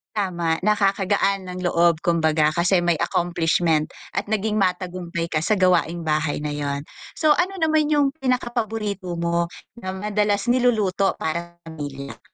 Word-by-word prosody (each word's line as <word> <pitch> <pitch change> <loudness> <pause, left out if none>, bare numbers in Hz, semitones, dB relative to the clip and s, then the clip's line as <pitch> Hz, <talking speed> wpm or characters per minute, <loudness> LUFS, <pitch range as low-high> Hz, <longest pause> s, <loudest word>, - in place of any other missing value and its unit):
Tama. 170 -5 0
Nakakagaan 200 -1 +1
ng 180 0 -6
loob 170 -2 +2
kumbaga, 160 -2 +2
kasi 175 +3 +2
may 175 -2 +1
accomplishment 170 -2 +1 0.2
at - - -3
naging 215 0 0
matagumpay 180 -2 -2
ka 155 - +1
sa 190 +7 +1
gawaing 175 -3 +2
bahay 155 -1 -1
na 150 - -2
'yon. 145 -1 -3 0.3
So, 310 -2 +2
ano 360 +4 +1
naman 310 -1 +3
yung 290 -2 +4
pinaka 255 -3 0
paborito 210 -6 -3
mo 170 0 0 0.3
na 185 -4 -5
madalas 210 +2 0
niluluto 215 -6 +2
para 170 +2 -4
pamilya? 145 -4 -7
180 Hz, 140 wpm, -23 LUFS, 165-210 Hz, 0.3 s, yung